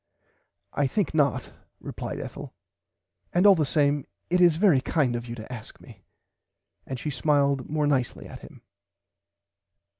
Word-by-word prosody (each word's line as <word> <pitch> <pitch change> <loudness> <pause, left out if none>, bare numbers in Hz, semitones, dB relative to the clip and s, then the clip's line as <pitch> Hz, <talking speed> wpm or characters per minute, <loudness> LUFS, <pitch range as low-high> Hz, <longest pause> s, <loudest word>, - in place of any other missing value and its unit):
I 145 - +1
think 200 +7 -1
not 140 -5 +1 0.3
replied - - -6
Ethel - - -8 0.8
and 180 +3 +3
all 200 - +9
the 155 -6 0
same 145 -1 +1 0.2
it 180 0 +3
is 175 -3 +6
very 175 -8 +4
kind 135 -4 0
of 120 0 -5
you 120 - -6
to 115 +2 -9
ask 110 -3 -10
me - - -15 0.9
and 130 -2 -5
she 150 - -3
smiled 140 -1 +1
more 150 0 0
nicely 135 -4 -1
at - - -10
him. - - -15
145 Hz, 150 wpm, -26 LUFS, 130-155 Hz, 0.9 s, all